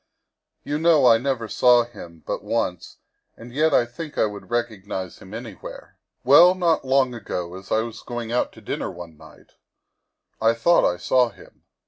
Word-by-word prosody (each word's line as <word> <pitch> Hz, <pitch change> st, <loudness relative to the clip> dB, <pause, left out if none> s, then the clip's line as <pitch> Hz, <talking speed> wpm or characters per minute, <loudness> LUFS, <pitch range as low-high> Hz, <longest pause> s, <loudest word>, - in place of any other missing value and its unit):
You 150 Hz, +1 st, -3 dB
know 165 Hz, -2 st, +4 dB
1 115 Hz, -3 st, +5 dB
never 130 Hz, -4 st, -2 dB
saw 120 Hz, +3 st, +4 dB
him 85 Hz, -9 st, -13 dB
but -, -, -4 dB
once, -, -, -3 dB, 0.4 s
and 120 Hz, +1 st, -12 dB
yet 155 Hz, +3 st, +2 dB
I 120 Hz, -, +3 dB
think 150 Hz, +6 st, -9 dB
I -, -, +3 dB
would 105 Hz, -1 st, -7 dB
recog 115 Hz, -4 st, -3 dB
nize 95 Hz, -3 st, -5 dB
him 95 Hz, -, -14 dB
anywhere. 110 Hz, -3 st, -9 dB, 0.3 s
Well, 170 Hz, +8 st, +7 dB
not 170 Hz, -3 st, +1 dB
long 130 Hz, -1 st, +2 dB
ago, 90 Hz, -7 st, -5 dB
as 95 Hz, +1 st, -12 dB
I 110 Hz, -, +3 dB
was 115 Hz, -1 st, -7 dB
going 120 Hz, -2 st, -6 dB
out 125 Hz, -, 0 dB
to -, -, -15 dB
dinner -, -, -4 dB
one 85 Hz, -2 st, -10 dB
night, -, -, -18 dB, 0.9 s
1 115 Hz, +1 st, +3 dB
thought 170 Hz, -, +3 dB
I 90 Hz, -, -6 dB
saw 125 Hz, +7 st, +2 dB
him. -, -, -19 dB
120 Hz, 180 wpm, -23 LUFS, 105-135 Hz, 0.9 s, Well